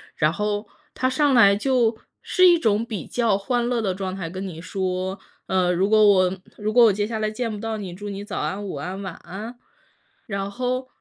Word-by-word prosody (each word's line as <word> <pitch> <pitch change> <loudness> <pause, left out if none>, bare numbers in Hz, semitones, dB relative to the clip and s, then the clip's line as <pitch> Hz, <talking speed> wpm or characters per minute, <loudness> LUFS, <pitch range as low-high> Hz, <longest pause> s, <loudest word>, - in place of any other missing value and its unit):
然 155 0 +2
后 210 +3 -2 0.3
他 255 - 0
上 285 +2 +2
来 200 -5 +7
就 235 0 +1 0.2
是 370 0 +4
一 350 -1 +6
种 220 -7 +1
比 215 -6 -5
较 230 -5 +1
欢 240 +4 -1
乐 240 -2 0
的 190 -3 0
状 190 0 -4
态， 175 -4 -5
跟 190 +3 -5
你 165 -3 -8
说：” 185 +1 -3 0.3
呃， 185 -1 +2
如 190 +3 +1
果 215 -1 +6
我 190 -1 +4 0.2
如 210 +1 -2
果 240 +1 +7
我 215 - +5
接 205 +1 -1
下 220 0 -3
来 215 0 0
见 230 +2 -3
不 210 - -5
到 225 +1 -3
你， 190 -4 -6
祝 205 +3 -8
你 200 0 -5
早 205 -1 -5
安、 200 +2 -3
午 185 - -5
安、 180 +7 -5
晚 185 - -5
安。 220 +7 -9 0.7
“然 195 -2 -3
后 255 +3 -2
205 Hz, 235 characters per minute, -23 LUFS, 190-230 Hz, 0.7 s, 来